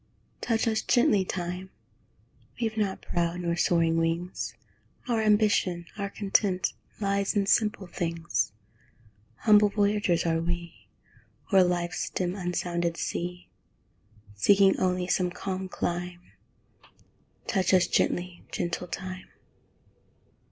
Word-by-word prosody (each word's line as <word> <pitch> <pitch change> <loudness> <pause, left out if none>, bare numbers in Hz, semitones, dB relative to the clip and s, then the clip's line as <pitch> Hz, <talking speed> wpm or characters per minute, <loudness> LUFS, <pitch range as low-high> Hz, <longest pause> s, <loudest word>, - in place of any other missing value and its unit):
Touch 225 -1 0
us 220 -1 +1
gently, 215 -5 +3
Time! 180 0 -4 0.9
We've 225 -2 -1
not 205 -3 -1
proud 170 +1 -1
nor 170 -1 0
soaring 165 -2 +2
wings; 165 +2 -2 0.5
Our 230 -3 +1
ambition, 205 -5 +2
our 200 -1 -3
content, 195 -2 +1 0.3
Lies 200 0 0
in 200 -1 +2
simple 210 0 +2
things. 170 - -2 0.9
Humble 210 -1 +6
voyagers 205 -4 +1
are 165 -1 +1
we, 170 0 -5 0.7
O'er 190 - +8
life's 175 -1 -1
dim 180 -1 -2
unsounded 175 -2 -2
sea, 180 +1 -4 0.9
Seeking 195 - +5
only 180 -1 +1
some 180 0 +1
calm 190 +1 -4
clime; 175 0 -4 1.1
Touch 190 -3 +1
us 185 -2 +5
gently, 175 0 0
gentle 175 +1 -3
Time! 185 +1 -6
180 Hz, 110 wpm, -27 LUFS, 175-200 Hz, 1.1 s, O'er